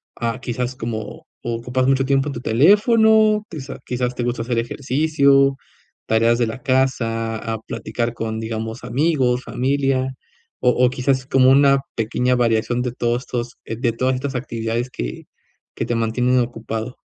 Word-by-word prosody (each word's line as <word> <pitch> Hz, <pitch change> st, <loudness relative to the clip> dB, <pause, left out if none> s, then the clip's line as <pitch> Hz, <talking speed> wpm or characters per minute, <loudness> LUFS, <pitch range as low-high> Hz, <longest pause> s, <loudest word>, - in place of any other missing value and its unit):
ah, 115 Hz, +1 st, -2 dB
quizás 125 Hz, 0 st, -3 dB
como, 115 Hz, -2 st, -6 dB, 0.2 s
¿ocupas 120 Hz, +2 st, -1 dB
mucho 135 Hz, 0 st, +3 dB
tiempo 135 Hz, +1 st, +1 dB
en -, -, -4 dB
tu 120 Hz, -, -5 dB
teléfono, 215 Hz, -, +4 dB
quizá 135 Hz, -5 st, -7 dB
quizás 125 Hz, 0 st, -2 dB
te 120 Hz, -, -2 dB
gusta 120 Hz, -1 st, -2 dB
hacer 120 Hz, 0 st, -2 dB
ejercicio, 140 Hz, +2 st, +2 dB, 0.5 s
tareas 115 Hz, +1 st, +3 dB
de 120 Hz, -, +2 dB
la 115 Hz, +3 st, -6 dB
casa, 120 Hz, -4 st, 0 dB
ah, 110 Hz, 0 st, -4 dB
platicar 115 Hz, +2 st, -3 dB
con, 110 Hz, -1 st, -4 dB
digamos, 110 Hz, +1 st, -5 dB
amigos, 130 Hz, -2 st, +1 dB
familia 130 Hz, 0 st, 0 dB, 0.5 s
o 125 Hz, -, +4 dB, 0.2 s
o -, -, +4 dB
quizás 130 Hz, +1 st, 0 dB
como 130 Hz, -1 st, +4 dB
una 140 Hz, 0 st, +5 dB, 0.2 s
pequeña 125 Hz, +3 st, +1 dB
variación 120 Hz, 0 st, +1 dB
de 125 Hz, -1 st, -2 dB
todos 120 Hz, +1 st, -1 dB
estos, 120 Hz, -1 st, -5 dB
eh, 115 Hz, -, -4 dB
de 120 Hz, -1 st, +1 dB
todas 130 Hz, +2 st, 0 dB
estas 135 Hz, +1 st, -4 dB
actividades 115 Hz, 0 st, -3 dB
que -, -, -6 dB, 0.5 s
que -, -, -2 dB
te 120 Hz, -, -1 dB
mantienen 125 Hz, +3 st, +1 dB
ocupado? 115 Hz, 0 st, -4 dB
125 Hz, 160 wpm, -21 LUFS, 115-135 Hz, 0.5 s, una